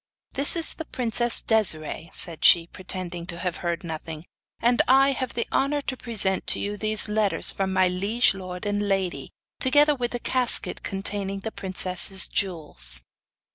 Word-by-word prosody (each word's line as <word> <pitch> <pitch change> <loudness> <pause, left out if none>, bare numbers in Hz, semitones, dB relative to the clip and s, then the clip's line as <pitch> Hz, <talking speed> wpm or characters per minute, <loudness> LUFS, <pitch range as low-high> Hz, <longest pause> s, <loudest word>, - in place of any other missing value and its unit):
'This 280 +6 +6
is 330 -1 +8
the 320 - -8
princess 240 -2 0
Desiree,' 165 -7 0
said 165 -3 +1
she, 170 -2 +6
pretending 180 -1 -7
to 170 - -7
have 180 -1 -4
heard 170 -1 -4
nothing, 160 -1 -7 0.3
'and 240 +1 +2
I 270 +2 +4
have 260 -2 -4
the 235 - -2
honour 285 +2 0
to 260 - -4
present 215 -6 -1
to - - +2
you 205 +1 -4
these 215 +1 +1
letters 210 -1 +1
from 190 -1 -3
my 185 0 +2
liege 200 +5 +1
lord 185 0 -8
and 205 0 -2
lady, 190 -2 -2 0.3
together 290 +3 +3
with 245 -4 -3
the 245 - -5
casket 250 0 +1
containing 195 0 -4
the 220 - -6
princess' 190 0 0
jewels. 145 - -3
195 Hz, 165 wpm, -24 LUFS, 180-240 Hz, 0.3 s, is